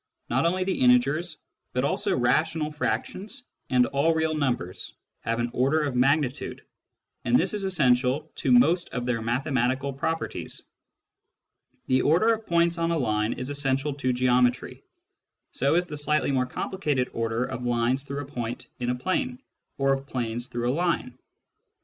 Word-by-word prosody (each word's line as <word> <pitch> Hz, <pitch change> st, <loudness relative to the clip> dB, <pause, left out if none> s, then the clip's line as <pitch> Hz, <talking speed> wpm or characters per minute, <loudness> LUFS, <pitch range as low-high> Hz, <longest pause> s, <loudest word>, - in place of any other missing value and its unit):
Not 165 Hz, -, +3 dB
only 185 Hz, +2 st, +1 dB
the 190 Hz, 0 st, -1 dB
integers, 140 Hz, +7 st, +3 dB, 0.4 s
but 125 Hz, -, 0 dB
also -, -, 0 dB
rational 155 Hz, +5 st, +1 dB
frac 150 Hz, -, -1 dB
tions 220 Hz, +7 st, -8 dB, 0.3 s
and 125 Hz, -1 st, +4 dB
all 145 Hz, +5 st, +1 dB
real 160 Hz, 0 st, +1 dB
numbers 120 Hz, -, -2 dB, 0.2 s
have 115 Hz, 0 st, -2 dB
an 120 Hz, 0 st, -1 dB
order 140 Hz, +5 st, +2 dB
of 140 Hz, -4 st, -2 dB
magnitude, 135 Hz, +2 st, +1 dB, 0.6 s
and 250 Hz, -, +4 dB
this -, -, +1 dB
is 205 Hz, -2 st, -1 dB
essential 140 Hz, -3 st, +2 dB
to 135 Hz, -, 0 dB
most 160 Hz, +9 st, +4 dB
of 125 Hz, -1 st, -2 dB
their 120 Hz, -2 st, -1 dB
mathematical 130 Hz, +3 st, 0 dB
properties. 160 Hz, +4 st, -3 dB, 1.2 s
The 130 Hz, 0 st, +2 dB
order 185 Hz, +10 st, +4 dB
of 225 Hz, 0 st, -6 dB
points 170 Hz, 0 st, +2 dB
on 165 Hz, 0 st, +1 dB
a 170 Hz, -, +1 dB
line 110 Hz, -5 st, 0 dB
is 125 Hz, +3 st, -5 dB
essential 140 Hz, 0 st, 0 dB
to 130 Hz, -2 st, -1 dB
geometry; 125 Hz, 0 st, +1 dB, 0.7 s
so 140 Hz, +4 st, +1 dB
is 175 Hz, +1 st, +2 dB
the 155 Hz, -, -7 dB
slightly 150 Hz, 0 st, +1 dB
more 130 Hz, -2 st, +1 dB
complicated 145 Hz, -3 st, -2 dB
order 115 Hz, +1 st, -1 dB
of 130 Hz, -2 st, -5 dB
lines 120 Hz, +2 st, +1 dB
through 140 Hz, +1 st, -5 dB
a -, -, -9 dB
point 120 Hz, -4 st, -5 dB
in 120 Hz, 0 st, -1 dB
a 125 Hz, -, +1 dB
plane, 245 Hz, -, -2 dB, 0.4 s
or 135 Hz, 0 st, +3 dB
of 135 Hz, 0 st, -4 dB
planes 120 Hz, -2 st, -3 dB
through 120 Hz, 0 st, -1 dB
a -, -, -1 dB
line. 165 Hz, -6 st, -1 dB
135 Hz, 165 wpm, -26 LUFS, 125-160 Hz, 1.2 s, and